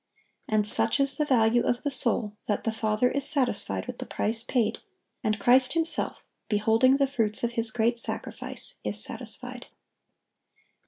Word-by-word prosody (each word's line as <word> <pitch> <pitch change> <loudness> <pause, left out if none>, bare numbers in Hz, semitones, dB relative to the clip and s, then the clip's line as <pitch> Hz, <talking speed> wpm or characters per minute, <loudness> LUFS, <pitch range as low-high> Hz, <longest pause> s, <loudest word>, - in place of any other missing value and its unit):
And 215 -1 0
such 210 - 0
is 275 0 +1
the 300 - 0
value 235 -2 +2
of 240 0 -2
the 285 - -1
soul 225 -5 0
that 205 - -2
the 225 - -2
Father 220 +2 -1
is 280 0 +5
satisfied 275 -5 -1
with - - -9
the - - -7
price 225 +1 +5
paid; 230 -2 -2 0.4
and 215 0 -1
Christ 255 +5 +3
Himself, 330 0 +1 0.3
beholding 225 +5 +2
the 275 - +2
fruits 225 -6 0
of 235 - -1
His 230 -1 +4
great 235 +1 -1
sacrifice, - - -4
is - - -4
satisfied. - - -7
235 Hz, 160 wpm, -25 LUFS, 220-260 Hz, 0.4 s, is